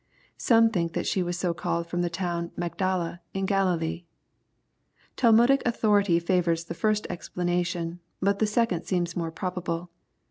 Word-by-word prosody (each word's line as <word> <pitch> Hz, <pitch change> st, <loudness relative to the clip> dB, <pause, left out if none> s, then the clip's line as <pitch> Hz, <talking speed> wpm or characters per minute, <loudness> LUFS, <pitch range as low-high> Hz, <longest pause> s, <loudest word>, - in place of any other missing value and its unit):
Some 230 Hz, -1 st, +5 dB
think 170 Hz, -4 st, -1 dB
that -, -, -2 dB
she 190 Hz, -, +1 dB
was 175 Hz, 0 st, -2 dB
so 175 Hz, -1 st, 0 dB
called 170 Hz, 0 st, -2 dB
from 175 Hz, +1 st, -2 dB
the 175 Hz, -, 0 dB
town 170 Hz, 0 st, -2 dB
of -, -, -14 dB
" -, -, -31 dB
Magdala/' 175 Hz, -2 st, -2 dB, 0.2 s
in 195 Hz, 0 st, 0 dB
Ghililee. 180 Hz, -4 st, 0 dB, 1.1 s
Tahnudic 240 Hz, +3 st, +5 dB
authority 205 Hz, -7 st, +3 dB
favors 170 Hz, -1 st, +1 dB
the 170 Hz, -, -6 dB
first 215 Hz, +4 st, 0 dB
explanation, 175 Hz, -1 st, -2 dB, 0.2 s
but 200 Hz, +1 st, +1 dB
the 215 Hz, -, +3 dB
second 210 Hz, -5 st, 0 dB
seems 175 Hz, -2 st, -1 dB
more 170 Hz, -2 st, -2 dB
probable. 175 Hz, 0 st, -4 dB
180 Hz, 155 wpm, -27 LUFS, 170-200 Hz, 1.1 s, Some